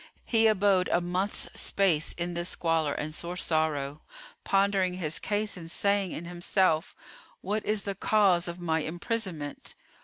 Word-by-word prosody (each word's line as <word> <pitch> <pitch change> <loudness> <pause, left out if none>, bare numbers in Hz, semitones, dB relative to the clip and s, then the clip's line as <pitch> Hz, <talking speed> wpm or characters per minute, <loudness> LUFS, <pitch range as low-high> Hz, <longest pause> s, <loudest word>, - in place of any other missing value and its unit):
He 225 -1 +4
abode 195 -3 +3
a - - +4
month's 180 +3 -2
space, 175 -6 +1
in 175 0 -3
this 175 +1 -1
squalor 160 -3 +1
and 155 +1 -4
sore 175 +3 -2
sorrow, 155 -4 0 0.4
pondering 195 -2 +2
his 160 -4 -2
case 210 0 -1
and 165 -3 -8
saying 200 0 +1
in 170 - -6
himself, 175 -1 +1 0.5
"What 210 +2 -1
is 210 -1 +1
the 200 - -2
cause 195 -3 +3
of 170 +1 -6
my 160 -2 0
imprisonment?" 170 -2 -3
180 Hz, 150 wpm, -28 LUFS, 165-200 Hz, 0.5 s, He